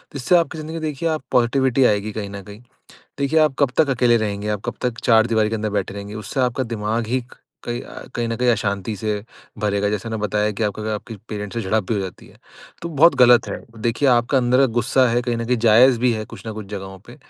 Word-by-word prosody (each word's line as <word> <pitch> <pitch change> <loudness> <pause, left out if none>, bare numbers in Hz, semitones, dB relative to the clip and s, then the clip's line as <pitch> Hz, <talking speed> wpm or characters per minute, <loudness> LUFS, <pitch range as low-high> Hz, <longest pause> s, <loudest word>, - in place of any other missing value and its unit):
इससे 140 +6 +2
आपकी 160 -1 -1
ज़िंदगी 155 +1 -6
में 165 - -4
देखिए 155 +1 -2
आप 155 -3 -2
पॉजिटिविटी 130 +1 +2
आएगी 105 0 +1
कहीं 105 -1 -5
न 100 0 -7
कहीं। 105 +3 -12 0.6
देखिए 140 +3 +2
आप 155 -3 +3
कब 140 -3 +3
तक 155 -3 +4
अकेले 125 -2 +3
रहेंगे, 105 -1 -2
आप 105 -1 -2
कब - - -3
तक 125 -2 -2
चारदीवारी 110 -1 +3
के 115 - -3
अंदर 110 0 -3
बैठे 100 -1 -2
रहेंगे, 100 +1 -7
उससे 110 +5 -4
आपका 125 +1 0
दिमाग 110 +2 -2
ही 130 +3 0
क - - -14 0.3
कई 120 0 -3
अ, - - -10
कहीं 120 -1 -1
न 115 - -2
कहीं 125 0 +1
अशांति 100 -1 -1
से 105 +2 -2 0.5
भरेगा। 105 -1 0
जैसे 105 +1 -3
मैंने 110 -1 -4
बताया 105 0 0
कि 105 +2 -4
आपको 105 0 -1
अगर 110 - -3
आपके 110 +2 -7
पेरेंट्स 105 0 -6
से 115 - 0
झड़प 110 +2 0
भी 115 - +1
हो 100 - -1
जाती 95 -2 -7
है - - -19 0.5
तो 170 - -3
बहुत 165 0 +5
गलत 120 -1 +6
है। - - -3 0.3
देखिए 120 +5 +1
आपका 120 +2 +3
अंदर 125 +2 +3
गुस्सा 130 +2 +3
है, 120 +1 +1
कहीं 120 -1 -1
न 115 - -3
कहीं 125 +1 +1
ज़ायज 120 +3 +6
भी 125 0 +2
है 110 -1 -3
कुछ - - -12
न 110 - -4
कुछ 110 -1 -8
ज़गहों 95 -2 -7
पे। - - -12
115 Hz, 250 wpm, -21 LUFS, 105-125 Hz, 0.6 s, गलत